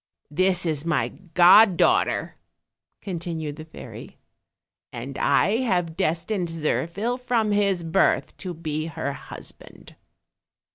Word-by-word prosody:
"This 185 +3 +1
is 155 -3 -1
my 170 +1 0
god 185 +2 +5
daughter," - - +1 0.6
continued 165 -5 -5
the 155 - -9
fairy, 160 - -11 0.7
"and 125 +3 -7
I 210 +3 +2
have 180 -10 -1
destined 175 +4 -1
Zirphil 170 +8 -2
from 235 -4 0
his 200 -4 +1
birth 165 +4 +1
to 180 -3 -6
be 155 -1 -4
her 160 -3 -4
husband." - - -12
175 Hz, 110 wpm, -24 LUFS, 160-195 Hz, 0.7 s, god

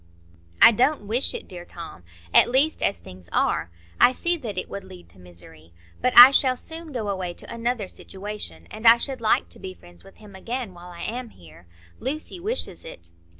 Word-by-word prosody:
"I - - +10
don't 245 +1 +1
wish 235 +6 0
it, - - -7
dear 175 -2 -9
Tom, 170 - -11 0.3
at - - +6
least 275 +5 +2
as 195 - 0
things 90 -2 -14
are; - - 0 0.3
I 250 - +6
see 345 +6 0
that 225 - -7
it - - -3
would 200 - -7
lead 85 -2 -14
to 90 +2 -19
misery. 85 -2 -14 0.3
But 250 -1 0
I 245 +2 +12
shall 260 -2 +2
soon 320 +2 -9
go 235 -6 -4
away 185 -3 -3
to - - -8
another 235 -3 -2
situation, 190 - -8
and 225 +2 -2
I 230 +1 +9
should 260 +1 -5
like 220 - +2
to - - -10
be 185 -1 -8
friends 85 - -18
with 195 - -17
him 210 -2 -15
again 230 +1 -5
while 175 0 -12
I 170 -1 -11
am 245 +1 -5
here. 85 - -18 0.3
Lucy 310 +6 -4
wishes 390 - -3
it." 85 - -11
210 Hz, 200 wpm, -24 LUFS, 165-250 Hz, 0.3 s, I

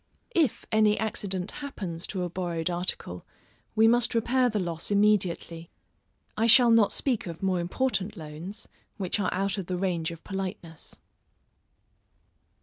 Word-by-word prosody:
If 320 - +1
any 215 -1 +4
accident 200 -4 -1
happens 190 - -5
to 185 -3 -3
a - - -1
borrowed 175 -1 -2
article, 175 - -3 0.5
we 220 +1 +6
must 240 +1 +3
repair 250 +2 +3
the 215 - -2
loss 170 -4 -3
immediately. 190 -5 +1 0.7
I 225 +1 +2
shall 235 +1 +7
not 225 -3 +5
speak 250 -8 0
of 165 +1 -7
more 185 -2 +1
important 205 +2 -1
loans, 165 +7 -7 0.3
which 195 0 -1
are 185 - 0
out 195 +1 -1
of 185 - -5
the 180 - -2
range 175 -3 -1
of 165 -1 -9
politeness. 185 -5 -5
195 Hz, 145 wpm, -27 LUFS, 175-220 Hz, 0.7 s, shall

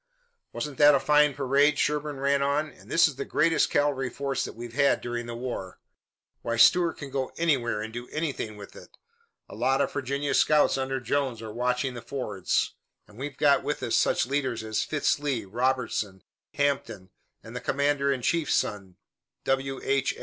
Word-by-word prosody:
"Wasn't 150 -2 -5
that 145 -1 +7
a - - +3
fine 150 0 +3
parade?" 140 +2 +3
Sherburne 150 -1 -1
ran 140 0 +2
on. 145 +2 0
"And 100 -2 -18
this 165 0 +5
is 145 -4 -7
the 140 - -2
greatest 160 +3 +2
cavalry 140 -3 +1
force 140 +1 -2
that - - -8
we've 120 0 -8
had 140 +1 +3
during 120 0 -4
the 120 - -5
war. 120 -7 -6 0.6
Why, 115 0 -2
Stuart 165 +10 +5
can 140 -2 -9
go 130 -1 -2
anywhere 125 -10 +1
and 110 0 -7
do 120 +1 -6
anything 140 -9 -3
with 100 -1 -11
it. - - -14 0.5
A - - -12
lot 135 +1 +1
of - - 0
Virginia 140 +1 -2
scouts 150 -1 +4
under 135 0 -2
Jones 130 -2 -1
are 110 -1 -7
watching 125 +2 -1
the 120 - -7
fords, 110 -9 -2 0.3
and 105 +3 -16
we've 135 0 -5
got 145 -1 +4
with - - -3
us - - 0
such - - +2
leaders 130 -4 -2
as 110 0 -1
Fitz 150 -1 0
Lee, 135 -7 -2
Robertson, 115 -4 -1 0.3
Hampton 135 -10 -1 0.3
and - - -11
the - - -4
commander 140 0 +1
in 130 -3 -2
chief's 165 0 +1
son, 95 -3 -2 0.5
W. 135 0 -1
H. 135 -1 +1
135 Hz, 185 wpm, -27 LUFS, 120-145 Hz, 0.6 s, that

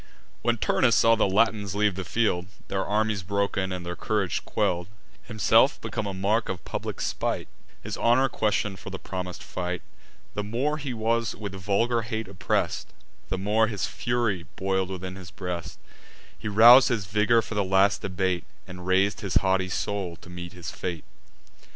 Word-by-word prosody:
When 120 0 +1
Turnus 115 +2 +3
saw 115 - +5
the 115 - +3
Latins 105 -1 +2
leave 105 -1 +2
the 95 +1 -4
field, 90 -5 0 0.2
Their 95 -1 0
armies 105 -1 0
broken, 100 0 -1
and 90 -1 -4
their 90 0 -4
courage 100 -5 -1
quell'd, 90 0 0 0.4
Himself 110 -5 +4
become 110 - -4
the 100 - -3
mark 105 +4 +1
of 90 -4 -5
public - - -4
spite, - - -2 0.4
His - - -5
honour 125 +3 +4
question'd 105 -5 -1
for - - -8
the - - -5
promis'd 90 -1 -6
fight; 90 -1 -4 0.5
The 105 - -2
more 130 +9 -1
he 140 -2 -4
was 115 0 0
with 100 -3 -6
vulgar 105 +5 +1
hate 110 -1 -4
oppress'd, 95 -2 -1 0.4
The - - -1
more 105 +3 +2
his 105 -3 -2
fury 120 -7 -1
boil'd 95 -1 0
within 95 0 -5
his 90 -3 -10
breast: 90 -3 -5 0.6
He - - -7
rous'd 115 +5 +8
his 115 -6 -1
vigour 105 +4 +3
for - - -7
the 105 -1 +1
last 95 +1 +3
debate, 90 -2 -1 0.2
And 90 0 -9
rais'd 95 +2 +2
his 95 -3 -3
haughty 95 -1 +2
soul 95 -2 -2
to 90 +1 -14
meet 90 +1 -7
his 90 +1 -6
fate. 85 -3 -5
100 Hz, 170 wpm, -26 LUFS, 90-110 Hz, 0.6 s, rous'd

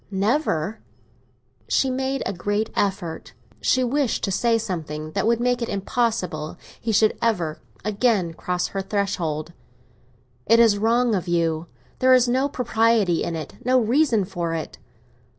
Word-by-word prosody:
—never?" 205 - 0 0.9
She 265 - +2
made 265 +1 -1
a - - -1
great 205 +4 -1
effort; 190 -5 -2 0.3
she 255 - +2
wished 260 0 0
to 195 - 0
say 230 +4 +2
something 155 -8 -4
that 215 - 0
would 230 0 +3
make 245 0 +1
it 235 - -2
impossible 195 -6 -2 0.2
he 230 - -2
should 215 0 +3
ever 175 -10 0 0.2
again 210 -5 +1
cross 180 +2 -2
her 195 - -3
threshold. 180 -6 -2 0.9
"It 230 +1 +6
is 220 -3 +5
wrong 235 +2 +2
of 185 -3 -1
you. 165 -1 0 0.3
There 260 0 +5
is 250 -1 +4
no 260 +3 +1
propriety 225 - +2
in 170 - -3
it—no 250 +10 0
reason 235 -2 +2
for 175 -3 -3
it." 160 - -6
210 Hz, 145 wpm, -23 LUFS, 175-235 Hz, 0.9 s, It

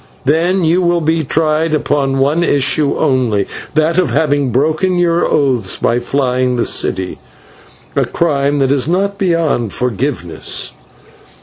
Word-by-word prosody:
Then 170 +6 +1
you 165 +3 +2
will 175 -1 +1
be 160 +1 0
tried 155 +2 0
upon 140 -2 0
one 145 +5 +1
issue 140 -1 +1
only 120 -7 +1 0.3
that 160 +3 +2
of 180 -6 +1
having 145 0 +1
broken 155 +8 +1
your 170 -1 +2
oaths 125 -9 0
by 120 - +1
flying 125 0 0
the 120 - 0
city 95 -1 0 0.8
a - - +2
crime 145 -3 0
that 135 -1 +1
is 140 -1 +1
not 195 +3 -1
beyond 165 - 0
forgiveness." 125 - -3
145 Hz, 135 wpm, -15 LUFS, 130-165 Hz, 0.8 s, you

